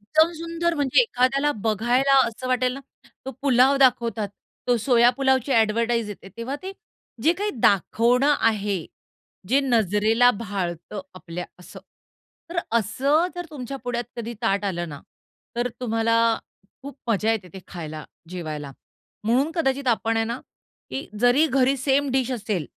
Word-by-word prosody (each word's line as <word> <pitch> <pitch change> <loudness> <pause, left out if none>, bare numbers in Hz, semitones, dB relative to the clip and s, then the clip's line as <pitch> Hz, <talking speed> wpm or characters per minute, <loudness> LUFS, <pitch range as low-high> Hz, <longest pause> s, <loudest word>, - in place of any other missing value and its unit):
एकदम 315 +11 +3
सुंदर 335 0 -1
म्हणजे 285 - +3
एखाद्याला 275 - +1
बघायला 240 +6 +2
असं 230 +3 -6
वाटेल 255 0 +1
ना, 275 - -7 0.5
तो - - -2
पुलाव 265 0 +4
दाखवतात. 235 -5 +2 0.4
तो 245 - +4
सोया 240 +1 +4
पुलावची 265 -1 +2
ॲडव्हर्टाईज 230 0 +2
येते 195 -1 -9
तेव्हा 255 +5 -4
ते 380 +1 -5 0.5
जे 320 - +5
काही 410 +4 -2
दाखवणं 245 - +3
आहे, 205 -5 0 0.6
जे 270 +3 +4
नजरेला 225 0 +3
भाळतं 200 -4 -4
आपल्या 180 -1 -7 0.2
असं, - - -12 0.7
तर 340 - -3 0.2
असं 275 - +1
जर 350 -1 -4
तुमच्या 275 -2 -6
पुढ्यात 245 -1 -2
कधी 235 0 -5
ताट 200 -2 +1
आलं 175 -4 -2
ना, 145 -2 -8 0.6
तर 240 +1 0
तुम्हाला 230 -1 +1 0.7
खूप 280 +1 -9
मजा 220 +1 +2
येते 200 -5 -4
ते 190 - -9
खायला, 155 -4 -7 0.3
जेवायला. 155 -5 -5 0.5
म्हणून 255 +7 +2
कदाचित 275 -4 0
आपण 225 -1 +1
आहे 225 - +2
ना, 235 +2 -4 0.5
की 275 - -5
जरी 245 +6 +5
घरी 270 -1 +2
सेम 275 +2 +1
डिश 260 -1 0
असेल, 210 - -2
240 Hz, 145 wpm, -24 LUFS, 210-270 Hz, 0.7 s, जे